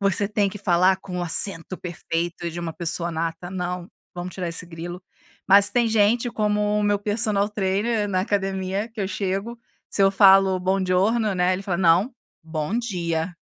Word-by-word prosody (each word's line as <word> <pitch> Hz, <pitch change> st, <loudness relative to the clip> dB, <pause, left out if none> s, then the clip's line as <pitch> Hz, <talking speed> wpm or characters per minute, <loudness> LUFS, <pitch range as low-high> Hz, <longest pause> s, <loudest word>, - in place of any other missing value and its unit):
você 200 Hz, 0 st, +1 dB
tem 205 Hz, -1 st, +1 dB
que 200 Hz, -, -8 dB
falar 185 Hz, -1 st, +3 dB
com 185 Hz, -1 st, -7 dB
o -, -, -2 dB
acento 175 Hz, +1 st, 0 dB
perfeito 170 Hz, -1 st, -4 dB
de 170 Hz, -, -7 dB
uma 170 Hz, -1 st, -4 dB
pessoa 170 Hz, +1 st, -1 dB
nata, 165 Hz, +2 st, -4 dB
não, 180 Hz, -1 st, -4 dB, 0.2 s
vamos 180 Hz, 0 st, -6 dB
tirar 180 Hz, -2 st, -3 dB
esse 170 Hz, +1 st, -2 dB
grilo. 175 Hz, +2 st, -8 dB, 0.4 s
Mas 200 Hz, +1 st, +6 dB
tem 235 Hz, +3 st, +2 dB
gente 225 Hz, +2 st, +2 dB
como 210 Hz, -1 st, 0 dB
o -, -, 0 dB
meu 205 Hz, 0 st, +2 dB
personal 205 Hz, 0 st, +1 dB
trainer 205 Hz, +2 st, 0 dB
na 185 Hz, -2 st, 0 dB
academia 195 Hz, +1 st, -2 dB
que 225 Hz, -, -20 dB
eu 190 Hz, -, -1 dB
chego, 195 Hz, +4 st, -3 dB, 0.3 s
se 200 Hz, -, +1 dB
eu 195 Hz, -, +5 dB
falo: 195 Hz, -1 st, +5 dB
"Buongiorno" 190 Hz, +3 st, +1 dB
né, 180 Hz, 0 st, +2 dB
ele 185 Hz, +1 st, -3 dB
fala: 180 Hz, -3 st, -2 dB
"Não, 185 Hz, +8 st, +3 dB, 0.3 s
bom 160 Hz, +6 st, -3 dB
dia." 175 Hz, -6 st, -2 dB
190 Hz, 180 wpm, -23 LUFS, 175-205 Hz, 0.4 s, Mas